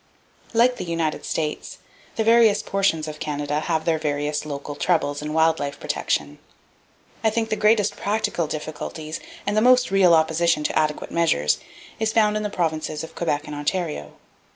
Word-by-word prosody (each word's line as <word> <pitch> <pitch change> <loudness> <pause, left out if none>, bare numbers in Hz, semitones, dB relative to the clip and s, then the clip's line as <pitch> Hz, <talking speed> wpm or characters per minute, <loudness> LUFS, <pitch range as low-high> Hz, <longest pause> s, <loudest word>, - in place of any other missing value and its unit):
(Page - - -23
226.) - - -4
Like 245 +1 +4
the 170 - -5
United 165 -2 -1
States, 155 -2 -3 0.4
the 220 - +1
various 225 -2 +5
portions 190 -6 0
of 150 0 -7
Canada 145 0 -2
have 160 0 -1
their 160 -2 +1
various 150 0 -2
local 145 0 -5
troubles 145 -2 0
in 150 0 -4
wild 160 +1 +3
life 140 -1 -4
protection. 75 0 -2 0.8
I 220 - +4
think 225 0 -1
the - - +2
greatest 215 -1 +3
practical 200 -5 -1
difficulties, 155 +1 -5 0.3
and 205 - 0
the 215 - +3
most 250 0 +5
real 185 -3 +6
opposition 160 0 +2
to - - -1
adequate 155 -1 -1
measures, 115 - +2 0.4
is 220 0 0
found 210 -2 +3
in 215 - 0
the 210 - -2
Provinces 155 -4 -2
of 160 - -9
Quebec 155 -3 -1
and 150 - -7
Ontario. 145 - -3
160 Hz, 175 wpm, -23 LUFS, 150-205 Hz, 0.8 s, real